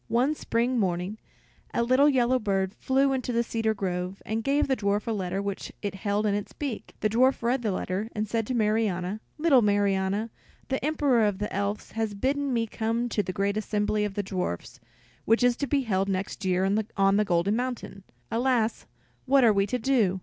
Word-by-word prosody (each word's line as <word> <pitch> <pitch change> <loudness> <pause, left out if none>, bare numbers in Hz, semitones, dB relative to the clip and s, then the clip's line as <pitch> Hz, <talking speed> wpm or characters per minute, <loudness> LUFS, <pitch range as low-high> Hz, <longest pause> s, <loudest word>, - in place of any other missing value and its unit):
One 255 +6 +2
spring 245 -3 0
morning 185 +2 -1 0.6
a 235 - +2
little 260 +5 +5
yellow 255 -2 +3
bird 195 -3 0
flew 270 +3 +1
into 255 -1 -2
the 235 0 +1
cedar 225 -1 -1
grove, 185 -1 -3
and 220 +1 -2
gave 280 +3 +2
the 265 - +2
dwarf 205 -2 0
a 230 - -1
letter 195 -2 -2
which 200 -1 -4
it 205 - -2
held 205 +2 -1
in 205 - +2
its 205 0 -3
beak. 275 -7 -5
The 215 - +2
dwarf 255 +3 +3
read 245 +2 +1
the 220 -3 0
letter, 190 +3 -2
and 215 0 -1
said 225 0 -1
to 255 - -1
Marianna, 210 -3 0 0.2
"Little 300 -5 +5
Marianna, 205 +1 +1 0.4
the 265 -1 -1
Emperor 285 -6 +2
of 205 -2 0
the 210 +1 -4
Elves 200 +2 -2
has 220 -2 -2
bidden 275 +5 0
me 230 -2 +1
come 230 +2 -2
to 215 - +1
the 195 - -4
great 200 +2 -1
assembly 210 0 0
of 205 -2 -3
the 205 - -1
dwarfs 180 - -4 0.5
which 225 +3 +3
is 245 -1 +4
to 280 - -2
be 280 0 +2
held 195 -5 0
next 195 +1 -3
year 185 0 +2 0.3
on 195 0 +4
the 210 - +4
Golden 180 +2 +1
Mountain. 240 -5 -4 0.3
Alas, 235 -2 +1 0.4
what 270 0 +5
are 225 -3 +6
we 200 0 +2
to 250 - -1
do? 220 -7 +2
215 Hz, 200 wpm, -27 LUFS, 200-245 Hz, 0.6 s, are